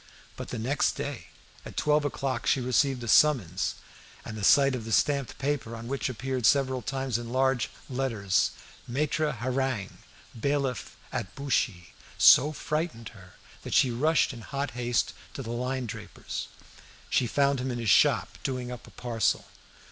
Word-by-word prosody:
But - - -7
the 125 - -5
next 130 +6 +1
day - - -5 0.4
at - - -10
twelve 150 0 +2
o'clock 130 -6 -2
she - - +3
received 130 0 +1
a - - -5
summons, 110 - +3 0.5
and 110 - -6
the 105 - -6
sight 140 +5 +6
of 125 -3 -3
the 115 - -6
stamped 140 +1 +1
paper, 135 -4 -2
on 115 0 -8
which 135 +1 -2
appeared 130 -1 -1
several 130 -2 +2
times 130 -1 -2
in 120 0 -7
large 130 -2 +1 0.2
letters, 115 -7 +1 0.4
"Maitre 150 +4 0
Hareng, 125 -3 -2 0.3
bailiff 140 +1 -2
at 95 - -4
Buchy," 120 -10 -1 0.2
so 145 +4 +7
frightened 155 -6 -3
her 95 -5 -15 0.3
that - - -3
she 130 - +5
rushed 150 +5 +2
in 120 - -9
hot 140 +5 -3
haste 120 0 0 0.2
to 135 - -5
the 115 - -5
linendraper's. 120 -3 -4 0.6
She 125 - +2
found 140 +2 +2
him 130 - -2
in 120 - -3
his 115 -4 +1
shop, - - +3
doing 125 -2 -3
up 125 - -9
a - - -12
parcel. 115 -2 -1
125 Hz, 160 wpm, -28 LUFS, 115-140 Hz, 0.6 s, so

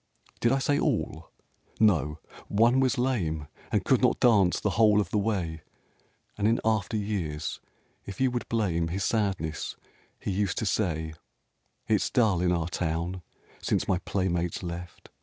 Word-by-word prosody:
Did 120 - +3
I 135 - +3
say, 145 +2 +1
all? 85 - -1 0.5
No! 80 -9 +3 0.3
One 115 +5 +4
was 130 0 +2
lame, 90 - -1 0.2
And - - +1
could - - +3
not - - +3
dance 100 -7 +4
the 105 - 0
whole 105 +1 +5
of 100 -5 -1
the 105 - +2
way; 90 -7 -2 0.8
And 105 - +2
in 115 +1 +3
after 110 -1 +1
years, 85 -8 -3 0.5
if 100 - -7
you 130 -1 +3
would 120 -1 -4
blame 90 -8 0
His 95 +4 -2
sadness, 95 -8 -1 0.4
he - - -3
was 95 - -2
used 100 -3 0
to - - -1
say, 80 -7 -1 0.7
"It's - - +2
dull 105 -8 +2
in 90 -1 +2
our 85 -2 0
town 85 +1 -2 0.4
since - - 0
my 90 - +2
playmates 90 -3 -1
left! 85 0 -7
95 Hz, 160 wpm, -28 LUFS, 85-110 Hz, 0.8 s, whole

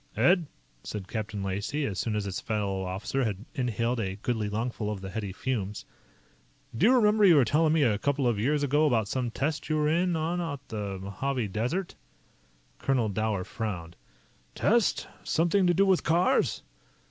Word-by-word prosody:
"Ed," 175 -3 +4 0.4
said 100 -3 -6
Captain 105 -2 -4
Lacey 100 +10 -2
as 95 -6 -3
soon 110 -2 -1
as 105 -1 -1
his 95 -2 -3
fellow 100 -4 -2
officer 105 +8 -2
had 105 -2 -3
inhaled 120 -1 -1
a 95 -3 -2
goodly 110 0 -2
lungful 110 0 -2
of 105 -2 -3
the 95 0 -6
heady 105 -3 -4
fumes, 105 -2 -3 0.9
"do 180 - +4
you 255 - +6
remember 210 -3 +4
you 180 -5 +8
were 140 -4 +5
telling 155 +6 +3
me 160 -2 +3
a 105 -5 +2
couple 140 +1 0
of 115 -4 +1
years 145 +6 +1
ago 145 +2 +3
about 115 -6 +1
some 125 +2 -1
test 150 +7 -2
you 155 - +2
were 150 0 +2
in 175 +2 +2
on 165 +3 -1
out 145 -5 -4
in - - -4
the 100 -2 -4
Mojave 105 +5 -3
Desert?" 125 - -2 0.9
Colonel 125 -5 +1
Dower 105 -1 -1
frowned. 90 -6 -5 0.6
"Test? 230 0 +2 0.2
Something 175 +4 +2
to 175 - +4
do 195 +3 +4
with 190 -2 +3
cars?" 170 +2 +2
120 Hz, 180 wpm, -28 LUFS, 105-155 Hz, 0.9 s, you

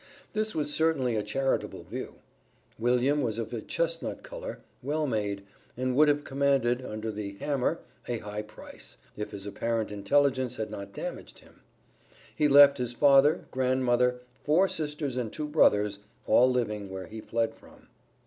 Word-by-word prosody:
This 215 -1 -1
was 150 -1 0
certainly 145 -7 +1
a 105 - +1
charitable 135 +5 -1
view. - - -7 0.6
William 125 +5 +2
was 115 -4 -1
of 115 0 -4
a 115 - -3
chestnut - - -2
color, - - -7 0.2
well 150 +4 -1
made, 105 -6 -2 0.3
and 130 0 -1
would 150 +2 +6
have 145 0 +2
commanded, 135 -3 +1
under 110 -1 -4
the 105 -1 -5
"hammer," 140 +7 -1 0.3
a 120 - -1
high 105 -1 -5
price, 105 0 -12 0.2
if 105 - -4
his 100 -1 -7
apparent 110 +1 -2
intelligence 130 +5 +1
had 110 - -4
not 100 0 -7
damaged - - -7
him. - - -19 0.7
He 150 - +3
left 140 -1 +8
his 125 -1 -2
father, 140 +3 +5
grand 130 0 +1
mother, 125 0 +2 0.2
four 170 +6 +4
sisters 150 -5 -3
and 120 -4 -2
two 150 -1 -4
brothers, 105 -9 +3 0.3
all 125 +1 +5
living 105 -5 -1
where 95 -1 -6
he 110 +4 -8
fled 115 0 -1
from. - - -19
125 Hz, 160 wpm, -28 LUFS, 110-145 Hz, 0.7 s, left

